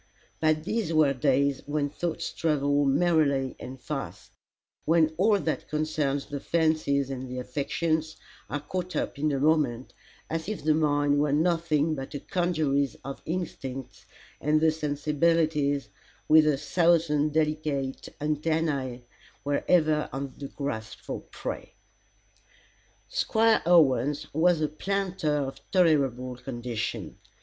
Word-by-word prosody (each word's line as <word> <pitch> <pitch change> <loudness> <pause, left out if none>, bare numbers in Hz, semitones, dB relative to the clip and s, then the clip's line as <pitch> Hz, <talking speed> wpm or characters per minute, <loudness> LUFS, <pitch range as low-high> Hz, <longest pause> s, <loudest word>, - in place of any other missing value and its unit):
But 155 -1 +2
these 210 -1 -1
were 155 -3 +4
days 140 0 +1
when 145 -1 0
thoughts 170 +1 -3
travel 145 -2 +1
merrily 140 -3 +2
and 130 +1 -8
fast 140 0 -6 0.5
when 160 -1 +3
all 205 +4 +4
that 160 -5 -3
concerns 150 -2 -1
the 145 - -5
fancies 155 -4 +1
and 130 -1 -5
the 125 - -5
affections, 155 +5 -2 0.3
are 145 - -3
caught 180 +4 -4
up - - -2
in 150 +1 +1
a 135 - 0
moment, 140 -5 +1 0.3
as 165 +3 -3
if 215 - -4
the 155 0 +4
mind 145 -2 +2
were 145 -1 +2
nothing 160 -1 +2
but 135 0 -6
a - - -3
congeries 155 -7 0
of 135 0 -6
instincts, 135 -7 -5 0.3
and 150 +1 +2
the 160 0 +4
sensibilities, 150 -1 +1 0.4
with 155 0 +6
a 150 -2 +3
thousand 155 -1 +2
delicate 150 -3 -1
antennae, 150 -4 -1 0.4
were 145 0 -1
ever 155 -3 +3
on 135 0 -5
the 140 - -5
grasp 110 -7 -5
for - - -6
prey. - - -7 1.3
Squire 225 0 +2
Owens 145 -3 +3
was 165 +1 +3
a 155 - +2
planter 190 0 -2
of 135 -2 -3
tolerable 135 -8 +2
condition. 120 -3 -5
150 Hz, 130 wpm, -27 LUFS, 140-160 Hz, 1.3 s, with